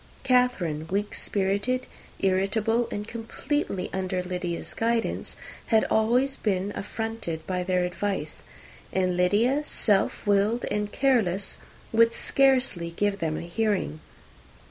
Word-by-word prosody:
Catherine, 200 - +2
weak 200 +4 -1
spirited, 205 +6 0 0.3
irritable, 210 +5 +1
and 205 0 -4
completely 230 -2 -3
under 185 -1 -1
Lydia's 180 -1 -4
guidance, 230 0 -1 0.3
had 220 -2 +4
been - - -4
always 245 +5 +2 0.3
affronted 210 -6 -4
by 180 -1 -1
their 180 0 +1
advice; 195 +3 -3 0.5
and 185 -1 +1
Lydia, 210 +10 +3
self 205 -8 +1
willed 205 +3 +2
and 210 0 -1
careless, 210 -9 +2 0.3
would 230 +1 +5
scarcely 260 -11 +2
give 205 -1 +1
them 160 -3 -1
a - - -4
hearing. 180 - -1
205 Hz, 115 wpm, -26 LUFS, 185-230 Hz, 0.5 s, would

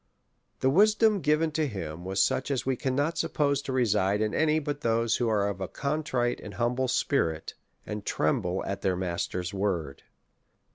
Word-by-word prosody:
The 130 - +3
wisdom 210 +4 +4
given 155 +2 +2
to 155 0 0
him 85 - -6
was 95 +1 +2
such 130 - 0
as 130 -4 0
wc 130 -2 -1
cannot 145 +5 0
suppose 140 -2 +1
to 140 - -5
reside 105 -6 +2
in 110 0 0
any 155 -1 +2
but 145 -1 -3
those 115 0 +1
who 120 -2 0
are 105 -2 +2
of 100 -2 -4
a 95 - -2
contrite 140 - -1
and - - -9
humble 125 +2 0
spirit, 85 - 0 0.3
and 105 -1 -5
tremble 90 +4 0
at 100 0 -4
their 95 -1 +1
Master's 90 +1 -3
word. 90 -8 -2
120 Hz, 175 wpm, -28 LUFS, 95-145 Hz, 0.3 s, wisdom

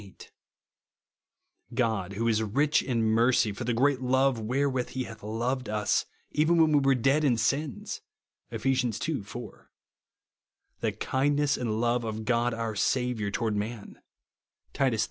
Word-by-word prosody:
8); 100 -2 -14 0.7
" - - -27
God, 110 -6 0
who 115 +4 -1
is 110 -1 +2
rich 140 +8 +2
in 120 -4 -1
onercy, 115 -2 +3
for 120 - -5
the 120 - 0
great 135 +2 +2
love 130 0 +2
wherewith 130 +3 0
he 130 - -3
hath 115 -2 -10
loved 120 +4 -2
its, 105 -1 0 0.2
even 160 +3 +3
when 160 -1 +5
we 145 - +5
were 135 -1 +3
dead 135 +5 +2
in 130 -5 +3
sins," 140 +4 -2 0.5
(Ej^^^ 125 -3 0
ii 135 - -3
4); 120 +5 -10 0.5
" - - -54
the - - +1
kindness 145 +1 +1
and 110 -3 -2
love 120 +1 +1
of 110 -1 -4
God 120 0 +2
our 115 -1 -3
Saviour 125 -1 0
to^^ard 110 +1 -1
man," 105 +1 -5 0.7
(Titus 130 -5 +1
iii. - - -5
120 Hz, 160 wpm, -28 LUFS, 110-135 Hz, 0.7 s, when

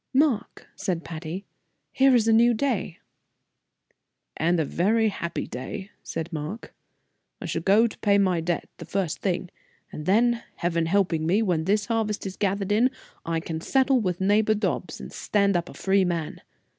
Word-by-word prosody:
"Mark," 270 -7 +1
said 185 -5 -2
Patty, 165 +3 -6 0.5
"here 270 -1 +4
is 225 -2 +3
a 225 - +5
new 235 +1 +5
day." 215 -8 -1 1.4
"And 170 +2 +1
a 160 - +1
very 220 +8 +2
happy 170 -4 -4
day," 190 +10 -7
said 165 +1 -5
Mark. 155 +9 -5 0.7
"I - - -6
shall 165 0 -2
go 205 +6 +4
pay 205 -2 +1
my 185 -4 +2
debt 170 +1 -2
the - - -8
first 190 -5 -2
thing; 180 -2 -1 0.4
and 150 - -7
then, 235 +4 +3
Heaven 170 -1 0
helping 170 -4 +1
me, 200 +6 +3
when 170 -6 0
this 205 +2 +2
harvest 220 -3 -1
is 190 -1 -5
gathered 200 0 -1
in, 230 +5 +4 0.4
I 165 -1 0
can 160 0 -5
settle 265 +5 +3
with 180 -4 -1
neighbor 210 +3 +3
Dobbs 210 - -2
and - - -9
stand 200 -2 +1
up 175 -1 -1
a - - -11
free 195 0 +2
man. 170 -4 -2
195 Hz, 170 wpm, -25 LUFS, 170-220 Hz, 1.4 s, a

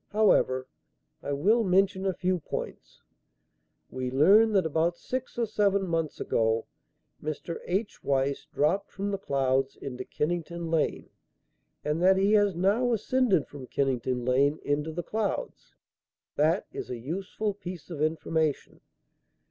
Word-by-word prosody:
However, 130 -12 +3 0.6
I 140 - -4
will 210 +12 +3
mention 190 0 +2
a 190 - +1
few 185 -1 0
points. 150 - -7 0.9
We 130 -1 -3
learn 195 - +5
that 190 -4 +3
about 160 +2 +1
six 255 -1 -5
or 235 - +1
seven 200 -2 +1
months 165 -3 -2
ago, 110 0 +1 0.6
Mr. 155 +2 -4
H. 200 +4 -2
Weiss 140 0 0
dropped 165 +7 +1
from 200 +1 -3
the 195 - -2
clouds 135 -4 0
into 130 -2 -6
Kennington 170 +3 -3
Lane 160 -2 0 0.7
and 150 +3 0
that 190 +1 +5
he 200 +2 +3
has 205 -3 +4
now 205 +8 +2
ascended 230 - +2
from 135 -3 -10
Kennington 125 -2 -1
Lane 140 +4 +3
into 145 +2 -1
the 175 +2 -4
clouds. 220 - -3 0.6
That 160 +5 +2
is - - -6
a 125 - -4
useful 190 - -3
piece 185 -4 -9
of 150 -3 -5
information. 155 -1 -1
170 Hz, 140 wpm, -28 LUFS, 140-200 Hz, 0.9 s, learn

